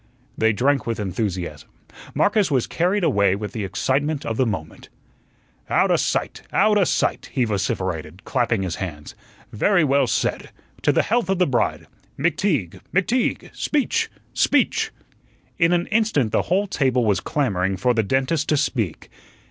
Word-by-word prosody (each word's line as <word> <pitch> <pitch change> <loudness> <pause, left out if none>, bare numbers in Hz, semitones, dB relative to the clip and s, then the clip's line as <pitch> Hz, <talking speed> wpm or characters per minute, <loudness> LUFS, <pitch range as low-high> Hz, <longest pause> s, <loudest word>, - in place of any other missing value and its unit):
They 110 0 +3
drank 135 +5 +1
with 115 -1 -2
enthusiasm. 95 -3 -3 0.5
Marcus 205 -2 +2
was 130 -5 +1
carried 185 +4 0
away 100 - +3
with 105 +1 -5
the 110 - -4
excitement 140 +9 -1
of 115 - -2
the 130 +1 +1
moment. 80 -8 -5 0.8
"Outa - - +3
sight, - - -1
outa 205 -2 +3
sight," - - 0
he 130 -3 +1
vociferated, 95 -5 -3
clapping 115 -6 0
his 90 -3 -3
hands. 75 -6 -6 0.4
"Very 175 - +3
well 140 -2 +3
said. - - -1 0.3
To - - +3
the - - +2
health 235 -1 0
of 195 - +2
the 180 - +3
bride. 130 -6 0 0.3
McTeague, 145 - 0
McTeague, 230 +7 0
speech, 295 -3 0 0.2
speech!" - - +2 0.7
In 165 0 +4
an 175 0 +2
instant 210 - +2
the - - +2
whole 195 +4 +2
table 130 - +1
was 105 -3 +2
clamoring 95 - -1
for 125 +6 +2
the 115 - +2
dentist 135 +7 0
to 150 - +3
speak. 115 - -2
130 Hz, 150 wpm, -22 LUFS, -, 0.8 s, In